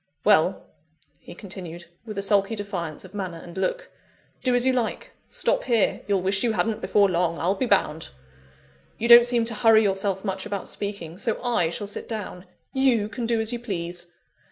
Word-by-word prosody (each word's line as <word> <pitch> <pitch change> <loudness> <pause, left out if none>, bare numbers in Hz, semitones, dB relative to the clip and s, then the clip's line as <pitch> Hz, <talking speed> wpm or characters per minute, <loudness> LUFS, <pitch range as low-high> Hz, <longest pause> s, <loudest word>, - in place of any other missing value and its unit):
"Well," - - +3 0.5
he - - -12
continued, 175 -4 -9 0.2
with 215 -2 -6
a 200 - +1
sulky 200 +2 +2
defiance 185 -6 -5
of 185 - -14
manner 185 -4 -4
and 170 +1 -11
look, - - -2 0.5
"do 255 -2 +1
as 245 0 +3
you 260 - +3
like; 245 -3 -2 0.2
stop - - 0
here 230 -5 +1
you'll 195 -3 +1
wish 195 +1 +1
you 230 -2 +1
hadn't 210 +3 -1
before 205 -1 +3
long, 175 -2 0
I'll 180 +3 +1
be 245 +6 -2
bound! 160 -7 +1 0.9
You 235 - -1
don't 235 0 +9
seem 240 -2 +1
to 230 - +1
hurry 220 0 +5
yourself 195 0 0
much 190 -1 -2
about 205 -2 -4
speaking, 190 -4 -6
so 225 0 -1
I 235 -9 +1
shall 205 +5 -4
sit 200 - -7
down. 200 -4 -6 0.3
You 255 -6 +2
can 235 0 -4
do 230 -1 +1
as 220 +2 -1
you 240 - -3
please. 175 -6 -4
205 Hz, 190 wpm, -25 LUFS, 185-230 Hz, 0.9 s, don't